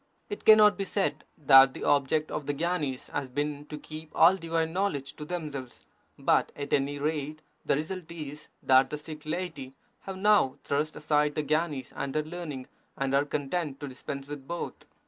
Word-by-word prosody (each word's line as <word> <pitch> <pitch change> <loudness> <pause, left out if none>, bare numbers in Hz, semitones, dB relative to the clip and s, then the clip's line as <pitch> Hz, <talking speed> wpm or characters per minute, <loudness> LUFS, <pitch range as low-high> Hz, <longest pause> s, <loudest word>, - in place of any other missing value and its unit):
It 415 - -6
cannot 215 -1 +7
be - - +1
said 190 -7 -1
that 135 -2 +7
the - - -6
object 145 +2 +2
of 150 -2 -4
the 145 - -1
gyanis 155 -5 -2
has 140 -2 -3
been 145 +2 -3
to 150 - -6
keep 155 +1 -9
all 175 +3 +7
divine 165 -2 -1
knowledge 165 -8 -1
to 150 - -6
themselves, 150 -7 -6 0.3
but - - +2
at 145 -1 -5
any 140 +1 +1
rate 150 +1 -3 0.2
the - - +2
result 165 +3 -4
is, 150 -3 -7 0.2
that 130 0 +5
the 150 - -3
Sikh 155 0 -9
laity 155 -6 -4 0.3
have 195 -1 -5
now 205 -9 +4
thrust 150 +2 -1
aside 150 -1 +1
the 155 - 0
gyanis 150 -3 -1
and 140 0 -4
their 155 - +2
learning, 155 -5 -6 0.3
and 135 0 -1
are 140 +1 +3
content 145 0 -2
to 145 - -5
dispense 135 +1 -7
with 145 -2 -8
both. 170 0 -5
150 Hz, 185 wpm, -28 LUFS, 140-165 Hz, 0.3 s, cannot